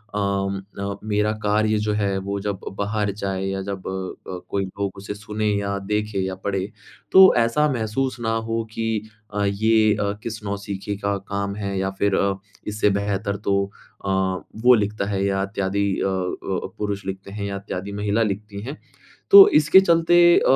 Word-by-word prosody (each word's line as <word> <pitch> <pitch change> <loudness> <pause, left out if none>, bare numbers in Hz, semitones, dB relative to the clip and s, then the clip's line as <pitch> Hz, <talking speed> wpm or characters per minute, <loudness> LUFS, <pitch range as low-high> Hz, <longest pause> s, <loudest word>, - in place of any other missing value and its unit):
अ - - 0
अ, 100 0 -2
मेरा 105 0 +1
कार्य 110 +1 +2
जो 105 0 0
है 100 -2 0
वो 100 +1 -3
जब 100 -1 -3 0.2
बाहर 105 0 -1
जाए 95 -1 -3
या 95 0 -2
जब 100 -1 -5
अ, 95 -1 -5
कोई 100 -1 -1
लोग 100 +1 -4
उसे 100 +1 -6
सुने 105 +1 -3
या 100 0 -2
देखे 105 -1 0
या 95 - -4
पढ़े। 100 0 -1 0.4
तो 190 0 +9
ऐसा 120 +6 +3
महसूस 125 +2 -2
ना 115 -1 -1 0.2
हो 115 0 0
कि 110 -1 -1 0.3
अ, 105 0 0
ये 110 +2 +3
अ, 100 -1 -1
किस 115 -2 -5
नौसिखे 100 0 -4
का 100 0 -1
काम 100 0 -4
है 100 -2 -3
या 95 0 0
फ़िर 100 -1 +2
अ, 100 0 +2 0.3
इससे 105 0 +1
बेहतर 100 0 -2
तो 100 0 +3 0.4
अ, - - -1 0.5
वो 125 +1 +8
लिखता 105 -1 -1
है 100 -1 0
या 95 -1 +1
इत्यादि 100 0 -1 0.2
अ - - +1
अ, 95 0 -2
पुरुष 100 -1 -3
लिखते 95 0 -6
हैं 100 0 -4
या 100 -1 -3
इत्यादि 100 0 -5
महिला 105 +2 0
लिखती 100 0 -4
हैं। 135 +8 -6 0.5
तो 400 -1 +12
इसके 155 +5 +7
चलते 170 -2 +3 0.2
अ, - - 0
100 Hz, 180 wpm, -23 LUFS, 100-110 Hz, 0.5 s, तो